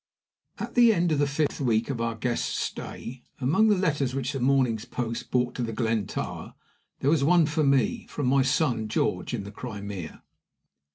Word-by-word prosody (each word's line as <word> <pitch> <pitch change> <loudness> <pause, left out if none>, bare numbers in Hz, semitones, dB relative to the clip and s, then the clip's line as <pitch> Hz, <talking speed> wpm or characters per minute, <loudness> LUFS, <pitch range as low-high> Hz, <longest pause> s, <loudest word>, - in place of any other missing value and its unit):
AT - - -5
the 240 -2 +6
end 175 -4 +1
of 150 - +1
the 145 - +3
fifth 145 +1 -1
week 115 -1 +1
of 120 -4 -3
our 115 -1 -1
guest's 120 +1 -1
stay, 125 +2 -5 0.2
among 155 - +3
the 210 -2 +4
letters 145 -8 0
which 135 +1 -2
the 135 - -3
morning's 125 -4 +2
post 115 -1 -4
brought 125 -1 +1
to - - -4
The 115 -1 -2
Glen 110 -3 0
Tower - - -5 0.5
there 140 - +3
was 155 -4 +3
one 170 +2 +5
for 150 +1 0
me, 140 -2 +2
from 145 - -3
my 135 +2 +4
son 130 -5 +1
George, 90 -4 -1
in 105 - -4
the 100 - -8
Crimea. 100 -5 -7
130 Hz, 190 wpm, -27 LUFS, 115-145 Hz, 0.5 s, the